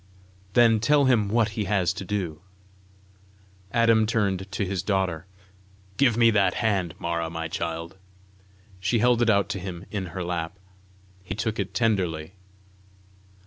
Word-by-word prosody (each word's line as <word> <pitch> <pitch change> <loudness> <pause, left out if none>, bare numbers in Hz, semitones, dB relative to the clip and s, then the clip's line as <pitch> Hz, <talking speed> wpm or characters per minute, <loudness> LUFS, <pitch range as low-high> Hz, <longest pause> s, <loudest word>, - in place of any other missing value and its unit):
"Then 115 -2 +5
tell 140 +5 +3
him 115 -6 +3
what 115 0 +2
he 105 -1 -3
has 95 -3 +1
to 95 - -6
do." 90 -5 -3 1.3
Adam 115 -2 +4
turned 100 -4 -1
to 100 - -1
his 95 -1 -2
daughter. 95 -4 -1 0.7
"Give 125 -5 +3
me 115 -1 +5
that 100 -3 +2
hand, 95 -8 0
Mara, 85 -1 -2
my 80 0 -4
child." 85 +2 -4 0.8
She 100 +6 +1
held 120 +1 +3
it 120 - +3
out 100 -2 +3
to 95 - -3
him 90 0 -7
in 100 -3 -3
her 90 +2 -5
lap. 85 +1 -3 0.6
He 90 -1 -6
took 110 +1 -2
it 100 -1 -3
tenderly. 95 -8 0
100 Hz, 145 wpm, -25 LUFS, 90-110 Hz, 1.3 s, Then